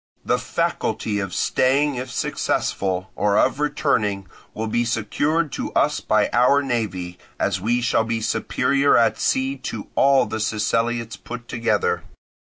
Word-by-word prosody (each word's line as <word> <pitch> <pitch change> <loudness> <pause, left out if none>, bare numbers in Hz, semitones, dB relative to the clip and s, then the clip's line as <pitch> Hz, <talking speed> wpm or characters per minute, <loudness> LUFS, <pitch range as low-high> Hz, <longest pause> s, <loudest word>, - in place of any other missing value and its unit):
The - - +1
faculty 105 -2 -1
of 95 -2 -3
staying 140 - +2
if 130 0 -5
successful, 95 -5 -1
or 100 0 +2
of - - +2
returning, 105 -10 0 0.3
will 110 - -2
be 120 +2 0
secured 145 +8 0
to - - -4
us - - +2
by - - +2
our 135 +4 +4
navy, 95 -9 -3 0.2
as - - 0
we 120 +4 +1
shall 115 -1 +2
be 115 0 -2
superior 135 +5 +2
at 115 - +2
sea 135 +1 0
to 115 -5 -6
all 135 0 +4
the 110 - -4
Siceliots 115 +2 -1
put 120 0 -8
together. 115 -2 0
115 Hz, 145 wpm, -22 LUFS, 105-130 Hz, 0.3 s, our